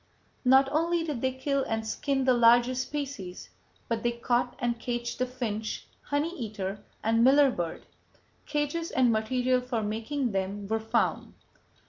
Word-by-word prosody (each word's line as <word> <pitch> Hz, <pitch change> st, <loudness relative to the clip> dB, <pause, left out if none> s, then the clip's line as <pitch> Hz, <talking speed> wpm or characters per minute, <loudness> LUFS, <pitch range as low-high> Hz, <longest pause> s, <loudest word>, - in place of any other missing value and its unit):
"Not 265 Hz, +1 st, +6 dB
only 335 Hz, +2 st, +1 dB
did 295 Hz, -7 st, -3 dB
they 260 Hz, -, +1 dB
kill 275 Hz, +1 st, -1 dB
and 220 Hz, -2 st, -2 dB
skin 270 Hz, +4 st, -1 dB
the 260 Hz, -, +5 dB
larger 240 Hz, +1 st, +5 dB
species 260 Hz, -8 st, -5 dB, 0.4 s
but 230 Hz, -1 st, -1 dB
they 240 Hz, +1 st, 0 dB
caught 245 Hz, +1 st, 0 dB
and 240 Hz, -3 st, -1 dB
caged 240 Hz, 0 st, -3 dB
the 255 Hz, -, +1 dB
finch, 220 Hz, -4 st, -4 dB, 0.2 s
honey 295 Hz, +5 st, -1 dB
eater, 205 Hz, -3 st, -4 dB, 0.2 s
and 225 Hz, +1 st, +3 dB
miller 275 Hz, +2 st, +6 dB
bird. 170 Hz, -7 st, -4 dB, 0.6 s
Cages 295 Hz, +3 st, -1 dB
and 255 Hz, -2 st, +3 dB
material 250 Hz, +3 st, +1 dB
for 245 Hz, -3 st, -2 dB
making 225 Hz, +5 st, -2 dB
them 195 Hz, +1 st, -2 dB
were 220 Hz, +2 st, 0 dB
found." 220 Hz, 0 st, -1 dB
245 Hz, 150 wpm, -28 LUFS, 220-270 Hz, 0.6 s, Not